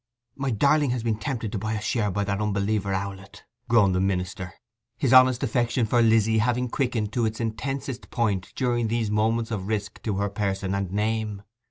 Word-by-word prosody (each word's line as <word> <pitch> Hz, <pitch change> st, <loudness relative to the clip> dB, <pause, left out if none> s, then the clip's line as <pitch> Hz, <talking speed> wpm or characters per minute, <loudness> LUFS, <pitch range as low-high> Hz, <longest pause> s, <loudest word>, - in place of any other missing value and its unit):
'My 140 Hz, -1 st, -2 dB
darling 140 Hz, +5 st, +3 dB
has 120 Hz, -2 st, -1 dB
been 115 Hz, -2 st, 0 dB
tempted 115 Hz, -3 st, -3 dB
to 105 Hz, -, -3 dB
buy 110 Hz, +2 st, -2 dB
a 110 Hz, -, -2 dB
share 105 Hz, 0 st, 0 dB
by 100 Hz, +2 st, -1 dB
that 100 Hz, 0 st, -2 dB
unbeliever 100 Hz, -1 st, 0 dB
Owlett,' 95 Hz, 0 st, -5 dB, 0.3 s
groaned 105 Hz, -5 st, +4 dB
the 90 Hz, -, +1 dB
minister, 95 Hz, -1 st, -2 dB, 0.4 s
his 130 Hz, -2 st, +1 dB
honest 130 Hz, 0 st, +6 dB
affection 120 Hz, -1 st, +1 dB
for 120 Hz, +2 st, +2 dB
Lizzy 110 Hz, -1 st, +4 dB
having 125 Hz, +2 st, +1 dB
quickened 115 Hz, -5 st, -1 dB
to 120 Hz, -2 st, +1 dB
its 110 Hz, 0 st, -5 dB
intensest 130 Hz, +3 st, -4 dB
point 100 Hz, -6 st, -1 dB
during 120 Hz, -2 st, 0 dB
these 110 Hz, -1 st, -1 dB
moments 115 Hz, +2 st, +1 dB
of 100 Hz, -3 st, -3 dB
risk 105 Hz, -1 st, -3 dB
to 105 Hz, -4 st, -2 dB
her 100 Hz, +1 st, 0 dB
person 95 Hz, -2 st, -2 dB
and 100 Hz, -2 st, -2 dB
name. 105 Hz, 0 st, -1 dB
110 Hz, 190 wpm, -25 LUFS, 100-120 Hz, 0.4 s, honest